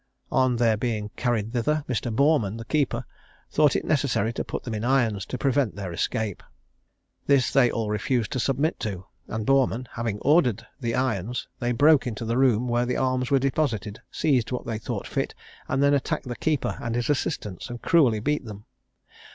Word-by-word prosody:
On 130 -1 +3
their 115 -2 +3
being 105 -3 -2
carried 115 -3 -1
thither, 145 +5 0
Mr. 120 -1 -2
Boreman, 120 -4 +2
the 115 - -7
keeper, 145 +2 0 0.5
thought 150 -2 +4
it - - -1
necessary 130 -7 +1
to - - -3
put - - -5
them 120 - -5
in 105 0 -3
irons, 120 -6 +1
to 125 - -4
prevent 135 -3 +1
their 95 -4 -5
escape. 110 +2 -2 0.9
This 140 -4 +3
they 130 -3 +5
all 115 -2 -2
refused 105 +2 -1
to 130 - -1
submit 140 +6 0
to; 95 -3 -4 0.2
and 110 -1 -4
Boreman 130 -2 +2
having 115 -3 -3
ordered 135 - +3
the 115 -3 -1
irons, 125 -2 -1
they 120 0 0
broke 145 +3 +4
into 115 -1 -4
the 115 +3 0
room 125 -2 +3
where 120 0 +1
the 125 - 0
arms 130 -1 0
were 140 - +4
deposited, 125 -7 -1
seized 130 -7 +1
what 125 - -3
they 115 -2 -3
thought - - -4
fit, - - -2 0.3
and 135 +2 +1
then 140 0 +4
attacked 140 -2 -1
the 120 - -4
keeper 155 0 -1
and 115 0 -2
his 120 0 -1
assistants, 105 -7 -3
and 120 0 -7
cruelly 135 -11 +4
beat 150 +7 0
them. 105 -3 -9
120 Hz, 190 wpm, -25 LUFS, 110-135 Hz, 0.9 s, they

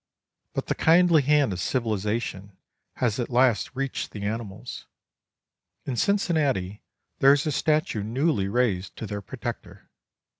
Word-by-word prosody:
But - - -2
the - - 0
kindly 170 -1 +5
hand 140 -5 +3
of 90 - -5
civilization 105 -3 -2 0.4
has 120 -2 0
at 120 - -2
last 125 -1 +2
reached 135 0 -3
the 105 - -8
animals. 105 -2 -5 1.0
In 130 - -3
Cincinnati 140 - 0 0.4
there 135 +1 +7
is 145 - 0
a 155 - 0
statue 150 -7 +1
newly 120 0 0
raised 100 -4 0
to - - -6
their 105 -1 -5
protector. 95 - -8
120 Hz, 135 wpm, -25 LUFS, 105-145 Hz, 1.0 s, there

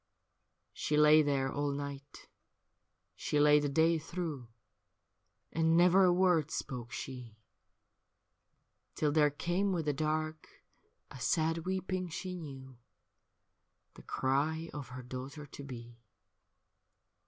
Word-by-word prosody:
She 150 - -1
lay 150 +1 +7
there 140 -2 0
all 145 0 -1
night, 140 0 -7 0.9
she 150 - -1
lay 150 0 +6
the 145 -1 -1
day 160 +3 +3
through, 160 -6 -5 1.1
And 165 0 +3
never 180 +2 +6
a 180 - +5
word 175 -4 +3
spoke 125 -5 -5
she. 120 -2 -7 1.6
Till 150 -1 +1
there 150 -1 +4
came 175 +7 -1
with 170 -4 -1
the 150 - +1
dark 155 +2 -3 0.5
a 135 - -9
sad 160 +4 0
weeping 185 -1 -2
she 180 +3 -5
knew 135 -6 -9 1.1
The - - -13
cry 155 +5 -1
of 145 -3 -6
her 130 0 -8
daughter 130 +4 -7
to 140 - -10
be. 120 -3 -9
150 Hz, 120 wpm, -32 LUFS, 135-165 Hz, 1.6 s, lay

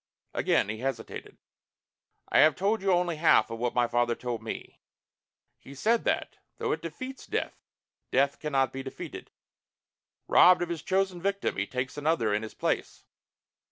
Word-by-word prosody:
Again - - +2
he 110 +1 -4
hesitated. 135 +2 -5 0.9
"I - - +3
have 155 -1 +6
told 205 +3 0
you 195 0 +2
only 175 -2 +1
half 150 -8 +4
of 115 - -5
what 120 0 -1
my 120 -1 +4
father 120 0 +1
told 120 -2 -4
me. 110 - -7 0.8
He 140 - -12
said 225 - +1
that, - - -1 0.2
though - - -1
it - - -1
defeats 260 0 -7
death, - - -3 0.5
Death 140 +2 +2
can 150 - -4
not 135 -1 +2
be 135 - -4
defeated. 135 0 -8 1.0
Robbed 180 0 +6
of 175 - -4
his 170 -3 -3
chosen 190 0 0
victim, 200 +2 -1
he - - -1
takes 130 +3 -4
another 145 -8 +1
in 105 - +1
his 110 - -8
place. - - -2
140 Hz, 165 wpm, -28 LUFS, 120-180 Hz, 1.0 s, have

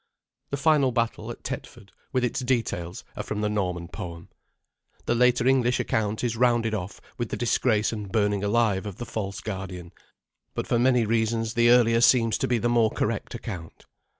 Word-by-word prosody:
The 140 - -2
final 145 -2 +3
battle 115 -2 -1
at 120 - -8
Tetford, 120 -5 -7 0.2
with 130 -3 0
its 125 - 0
details, 115 -9 -2
are - - -3
from 105 0 -4
the 105 - 0
Norman 90 -5 -2
poem. 85 -1 -8 0.8
The - - +1
later 125 0 +3
English 125 -2 +3
account 110 0 -1
is 120 -2 0
rounded 120 -2 +2
off 95 -2 -4 0.2
with 120 -2 -2
the - - -3
disgrace 115 -2 +1
and 105 -3 -6
burning 105 -2 +1
alive 105 -2 +1
of 100 - -6
the 120 - -5
false 100 -4 -4
guardian; 95 -4 -6 0.6
but - - -2
for 120 - +1
many 125 -1 +3
reasons 115 0 0
the 120 0 +4
earlier 115 -1 +5
seems 115 -2 +4
to - - 0
be 125 - +2
the 115 - 0
more 120 -2 +3
correct 110 +2 -2
account. 95 -8 -8
115 Hz, 180 wpm, -26 LUFS, 105-120 Hz, 0.8 s, earlier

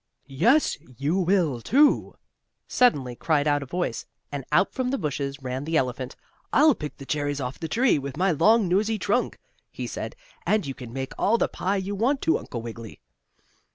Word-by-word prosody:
"Yes, 185 - +2 0.2
you 145 +7 0
will, 175 -9 +1
too!" 285 - +3 0.5
suddenly 140 - +2
cried 150 +2 +1
out 145 -1 +2
a 140 - -7
voice, 175 +6 -3 0.2
and 140 -2 -4
out 170 +6 +3
from 255 -1 -1
the 275 - 0
bushes 140 - -3
ran 130 +1 -3
the 160 +2 0
elephant. 130 -1 -2 0.4
"I'll 300 +1 +6
pick 150 -9 -7
the 135 - -10
cherries 145 0 -1
off 125 -1 -4
the 165 - -4
tree 235 - +2
with 140 0 -6
my 190 +2 +2
long, 205 +7 +4
nosey 210 +5 +1
trunk," 210 +5 0 0.3
he - - -6
said, - - -5 0.3
"and 215 -4 +1
you 135 - -4
can 125 -3 -10
make 130 +1 -5
all 225 +4 +3
the - - +1
pie 195 +2 -2
you 195 +1 -3
want 245 +8 +1
to, 325 - +2
Uncle 115 -2 -7
Wiggily." 115 -1 -8
155 Hz, 190 wpm, -25 LUFS, 135-210 Hz, 0.5 s, I'll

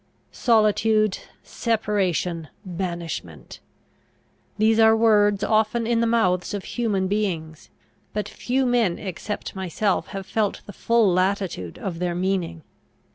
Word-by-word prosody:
Solitude, 215 -2 +2 0.2
separation, 190 -7 -1 0.2
banishment! 170 - -5 1.0
These 220 +1 +3
are 220 0 +6
words 210 -3 +4
often 220 +2 +1
in 230 0 +1
the 230 - +2
mouths 195 -5 +1
of 200 - -5
human 210 -6 -1
beings; 175 -6 -3 0.4
but 210 -1 -3
few 255 +5 -1
men 235 -8 +2
except 205 +2 -5
myself 190 +1 -1
have 195 -1 -6
felt 210 0 -1
the 205 - -10
full 230 -2 +2
latitude 185 - -1
of 175 -4 -5
their 175 -1 -1
meaning. 175 -3 -2
205 Hz, 120 wpm, -23 LUFS, 180-220 Hz, 1.0 s, are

